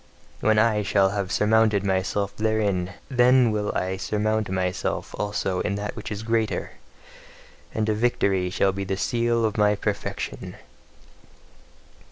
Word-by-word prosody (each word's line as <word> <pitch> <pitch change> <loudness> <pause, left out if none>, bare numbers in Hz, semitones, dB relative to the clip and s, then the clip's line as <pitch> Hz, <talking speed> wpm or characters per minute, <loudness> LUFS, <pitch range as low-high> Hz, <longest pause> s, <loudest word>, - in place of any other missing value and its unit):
When 110 0 +2
I 110 -1 +3
shall 100 -1 +3
have 100 -1 -3
surmounted 110 -1 +3
myself 100 +1 -1
therein, 105 -4 0
then 125 -2 +4
will 105 -1 -1
I 95 +1 -1
surmount 110 +1 -1
myself 95 -1 -2
also 100 -3 -1
in 100 - -1
that 105 0 -4
which - - -7
is 105 +1 -4
greater; 115 -1 -1 1.0
and 110 -1 -1
a 110 - +2
VICTORY 100 -5 +1
shall 95 +1 +2
be 100 +1 -4
the 95 0 -3
seal 115 +1 +1
of 110 0 -1
my 105 0 +4
perfection! 105 0 -4
105 Hz, 140 wpm, -24 LUFS, 95-110 Hz, 1.0 s, then